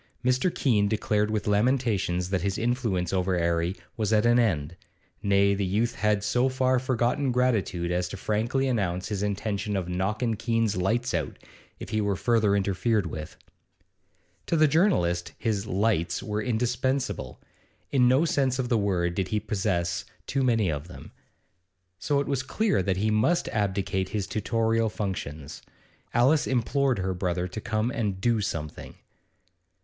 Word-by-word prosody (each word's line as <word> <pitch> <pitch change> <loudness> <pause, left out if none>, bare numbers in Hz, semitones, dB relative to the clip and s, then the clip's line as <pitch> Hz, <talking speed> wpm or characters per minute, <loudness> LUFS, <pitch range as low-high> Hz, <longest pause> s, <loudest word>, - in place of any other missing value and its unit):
Mr. 125 +7 +3
Keene 105 -10 +2
declared 105 0 0
with 110 -1 -1
lamentations 105 -5 +1
that 95 -2 +1
his 100 +2 -1
influence 115 -7 -1
over 95 0 +1
'Arry 85 +1 0 0.2
was 110 -2 -1
at 110 0 +3
an 120 +1 +5
end; 85 -8 0 0.5
nay, 100 0 +3
the 100 0 -1
youth 105 +5 0
had 105 -1 +1
so 125 +5 +2
far 130 -1 +2
forgotten 130 +2 0
gratitude 110 -9 0
as 90 0 0
to 100 - -7
frankly 115 +7 0
announce 95 -7 -1
his 100 -2 -2
intention 105 0 -2
of 95 -3 -2
'knockin' 105 +6 -1
Keene's 115 -1 0
lights 115 +7 0
out' 80 -5 -2 0.4
if - - -7
he 110 - 0
were 100 -1 0
further 110 -1 +2
interfered 100 +2 +1
with. 80 -2 -7 1.1
To 165 - +1
the 155 0 +5
journalist 115 - +1
his 105 -3 -1
'lights' 100 -4 0
were 105 0 -2
indispensable; 125 +3 -1 0.5
in 125 -3 +4
no 130 +6 +4
sense 135 -5 +1
of 125 -2 -2
the 115 -3 +2
word 90 -4 0
did 95 +1 -1
he 105 +2 0
possess 95 -5 -1 0.2
too 135 - -1
many 115 -8 +2
of 75 +2 -5
them; 90 - -11 0.9
so 140 +9 +1
it 140 - 0
was 140 -2 -1
clear 165 - 0
that 95 0 0
he 110 +3 +1
must 140 +12 +2
abdicate 95 -2 -1
his 105 -3 -2
tutorial 115 +1 0
functions. 80 -8 -5 0.5
Alice 135 +6 +3
implored 130 +1 +1
her 95 0 -1
brother 90 -1 -2
to 95 +4 -7
come 110 +1 -1
and 105 -5 -2
'do 115 +1 +1
something. 75 -6 -5
105 Hz, 160 wpm, -27 LUFS, 95-120 Hz, 1.1 s, an